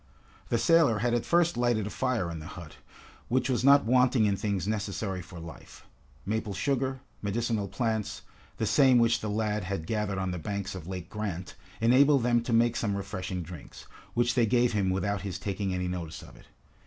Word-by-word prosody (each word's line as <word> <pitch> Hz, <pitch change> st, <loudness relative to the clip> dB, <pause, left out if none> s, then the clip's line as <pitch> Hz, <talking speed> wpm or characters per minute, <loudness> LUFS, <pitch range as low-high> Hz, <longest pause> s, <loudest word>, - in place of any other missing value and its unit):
The 115 Hz, -, +2 dB
sailor 160 Hz, -4 st, +4 dB
had 120 Hz, +3 st, 0 dB
at 120 Hz, -, 0 dB
first 170 Hz, 0 st, +3 dB
lighted 120 Hz, -4 st, +1 dB
a 105 Hz, -, -5 dB
fire 125 Hz, -10 st, -1 dB
in 80 Hz, -, -6 dB
the 75 Hz, -, -9 dB
hut, 85 Hz, -5 st, -10 dB, 0.5 s
which 130 Hz, +2 st, +1 dB
was 125 Hz, -, 0 dB
not 140 Hz, -1 st, +6 dB
wanting 125 Hz, -1 st, +4 dB
in 100 Hz, -1 st, +2 dB
things 100 Hz, -2 st, -2 dB
necessary 100 Hz, -3 st, -2 dB
for 85 Hz, 0 st, -11 dB
life. 80 Hz, -2 st, -11 dB, 0.4 s
Maple 105 Hz, -1 st, -2 dB
sugar, 135 Hz, -1 st, -1 dB, 0.2 s
medicinal 110 Hz, 0 st, -1 dB
plants, 110 Hz, -1 st, -2 dB, 0.3 s
the -, -, -1 dB
same 130 Hz, -3 st, +5 dB
which 115 Hz, -1 st, +3 dB
the 105 Hz, -, -4 dB
lad 105 Hz, -1 st, -1 dB
had 95 Hz, -4 st, -3 dB
gathered 105 Hz, -1 st, -2 dB
on 95 Hz, -1 st, -1 dB
the 90 Hz, -, -4 dB
banks 100 Hz, +3 st, -4 dB
of 90 Hz, -3 st, -8 dB
Lake 90 Hz, -3 st, -5 dB
Grant, 95 Hz, -4 st, -5 dB, 0.3 s
enabled 130 Hz, +3 st, +5 dB
them 120 Hz, -1 st, +3 dB
to 120 Hz, -, -4 dB
make 115 Hz, +1 st, +3 dB
some 100 Hz, -4 st, -1 dB
refreshing 95 Hz, -2 st, -4 dB
drinks, 85 Hz, -2 st, -11 dB, 0.3 s
which 120 Hz, 0 st, +2 dB
they 120 Hz, -2 st, +3 dB
gave 120 Hz, +1 st, +2 dB
him 100 Hz, -3 st, +1 dB
without 95 Hz, +1 st, -1 dB
his 95 Hz, -2 st, -4 dB
taking 100 Hz, 0 st, -3 dB
any 90 Hz, 0 st, -2 dB
notice 90 Hz, -3 st, -5 dB
of -, -, -14 dB
it. -, -, -18 dB
105 Hz, 195 wpm, -28 LUFS, 95-120 Hz, 0.5 s, not